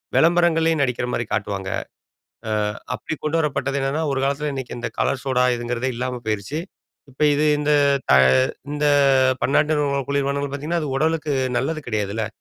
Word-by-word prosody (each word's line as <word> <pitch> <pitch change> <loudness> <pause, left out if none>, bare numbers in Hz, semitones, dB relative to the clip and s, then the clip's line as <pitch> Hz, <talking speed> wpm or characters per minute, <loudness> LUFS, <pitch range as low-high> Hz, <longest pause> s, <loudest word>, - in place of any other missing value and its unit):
விளம்பரங்கள்லயே 165 -1 +3
நடிக்கிற 125 -2 0
மாரி 120 - -1
காட்டுவாங்க. 100 -2 -2 0.8
அ - - -2 0.4
அப்படி - - -4
கொண்டுவரப்பட்டது 150 -3 0
என்னான்னா, 140 +4 -1
ஒரு 135 - -1
காலத்துல 140 +2 -1
இன்னைக்கு 130 -3 -6
இந்த - - -3
கலர் 130 - 0
சோடா 125 -2 +2
இதுங்கிறதே 120 +2 -2
இல்லாம 125 0 -3
போயிருச்சு. 110 +8 -2 0.5
இப்ப 135 +4 -6
இது 150 +2 +1
இந்த 150 0 0 0.4
தா - - +7 0.6
இந்த 150 0 0 0.6
பன்னாட்டு 150 +3 +2
நிறுவனங்கள் 140 -2 0
குளிர்பானங்கள் 140 0 -1
பாத்தீங்கன்னா, 160 +4 -2
அது 145 - -3
உடலுக்கு 155 -1 0 0.3
நல்லது 155 +4 -2
கிடையாதுல்ல. 105 +1 -2
140 Hz, 145 wpm, -22 LUFS, 125-150 Hz, 0.8 s, தா